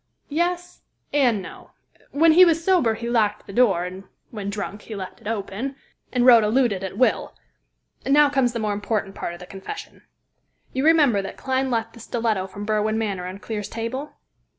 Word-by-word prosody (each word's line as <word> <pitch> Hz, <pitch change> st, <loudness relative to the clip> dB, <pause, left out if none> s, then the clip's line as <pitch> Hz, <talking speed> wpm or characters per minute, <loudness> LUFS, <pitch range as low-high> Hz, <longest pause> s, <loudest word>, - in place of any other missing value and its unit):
"Yes, 350 Hz, +3 st, -2 dB, 0.3 s
and 245 Hz, -9 st, +2 dB
no. -, -, -12 dB, 0.4 s
When 320 Hz, +3 st, +4 dB
he 355 Hz, +4 st, +8 dB
was 330 Hz, -2 st, +3 dB
sober 330 Hz, -12 st, +3 dB
he 235 Hz, +1 st, -5 dB
locked 215 Hz, -3 st, +1 dB
the 200 Hz, -, -10 dB
door, 200 Hz, -7 st, +3 dB
and 185 Hz, +2 st, -8 dB, 0.3 s
when 205 Hz, -3 st, -5 dB
drunk 205 Hz, 0 st, -5 dB
he 220 Hz, -, -8 dB
left 190 Hz, -2 st, -7 dB
it -, -, -10 dB
open, 225 Hz, +5 st, -3 dB, 0.4 s
and 245 Hz, -1 st, +2 dB
Rhoda 235 Hz, -4 st, +7 dB
looted 225 Hz, -5 st, +1 dB
at 190 Hz, -, -5 dB
will. 255 Hz, -, +1 dB, 0.7 s
And -, -, -2 dB
now 295 Hz, +1 st, +7 dB
comes 270 Hz, -4 st, +1 dB
the -, -, -2 dB
more 215 Hz, -2 st, -1 dB
important 205 Hz, -1 st, -2 dB
part 175 Hz, -, -5 dB
of -, -, -13 dB
the 180 Hz, -, -9 dB
confession. 195 Hz, -, -9 dB, 0.7 s
You 265 Hz, +2 st, 0 dB
remember 295 Hz, -10 st, +5 dB
that 195 Hz, -, -7 dB
Clyne 265 Hz, 0 st, -1 dB
left 230 Hz, -2 st, -1 dB
the 235 Hz, -, -13 dB
stiletto 225 Hz, -5 st, -1 dB
from 200 Hz, +2 st, -8 dB
Berwin 215 Hz, 0 st, 0 dB
Manor 200 Hz, -5 st, -2 dB
on 185 Hz, +1 st, -7 dB
Clear's 210 Hz, 0 st, -5 dB
table?" 245 Hz, +6 st, -5 dB
225 Hz, 190 wpm, -23 LUFS, 200-265 Hz, 0.7 s, he